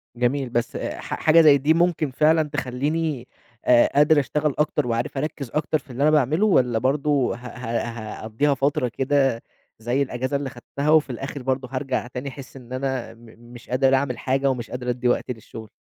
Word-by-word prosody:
جميل، 125 +2 0
بس 120 0 -2
ح - - -5
حاجة 160 +1 +5
زَي 150 -3 +7
دي 145 +4 +2
ممكن 165 -4 +1
فعلًا 155 +4 +3
تخلّيني 145 0 -2 0.4
آآ 120 -1 +6
قادر 150 +1 +5
أشتغل 150 +2 0
أكتر، 150 -4 +1
وعارف 120 +3 -2
أركّز 140 -3 -4
أكتر 155 +1 0
في 140 - -25
اللي 125 +3 -2
أنا 155 - +5
باعمله؟ 155 - +3
والّا 125 - +3
برضه 140 +1 +1
ه 125 +1 -10
ه 120 -1 -3 0.3
هاقضّيها 115 +7 +1
فترة 140 0 0
كده 135 -1 0 0.4
زَي 120 +5 0
الأجازة 130 +1 -2
اللي 140 -1 -4
خدتها 140 +2 -4
وفي 155 -2 +4
الآخر 135 +2 -6
برضه 130 0 -1
هارجَع 130 -2 -2
تاني 125 +3 -6
أحس 135 0 -11
إن 125 -1 -11
أنا 130 -1 -3
م 115 +1 -18 0.3
مش 120 - -13
قادر 130 +1 +3
أعمل 130 -2 -1
حاجة، 135 +1 0
ومش 125 -3 -3
قادر 125 0 -4
ادّي 125 0 -1
وقت 125 - 0
للشغل؟ 110 -2 -9
135 Hz, 185 wpm, -23 LUFS, 125-145 Hz, 0.4 s, زَي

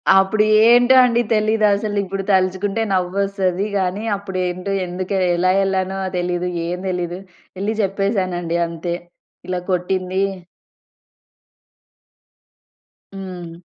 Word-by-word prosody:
అప్పుడేంటో 215 +5 +5
అండి 240 0 +2
తెలీదసలు. 215 -1 +1
ఇప్పుడు 195 +1 -4
తలుచుకుంటే 190 +3 +1
నవ్వొస్తది 190 +1 0
గానీ, 190 +3 -1
అప్పుడేంటో 185 -1 -3
ఎందుకే 185 +2 -2 0.2
ఎలా 185 +1 +2
ఎళ్ళానో 190 0 -1 0.2
తెలీదు. 180 0 -1 0.2
ఏం 180 +1 -3
తెలీదు. 180 0 -3 0.4
ఎళ్లి 215 +2 0
జెప్పేసానండి 190 -4 -1
అంతే. 170 +1 -4 0.5
ఇలా 180 -1 -2
కొట్టింది 185 +1 -1 2.9
హ్మ్. 180 -3 -8
190 Hz, 90 wpm, -20 LUFS, 180-200 Hz, 2.9 s, అప్పుడేంటో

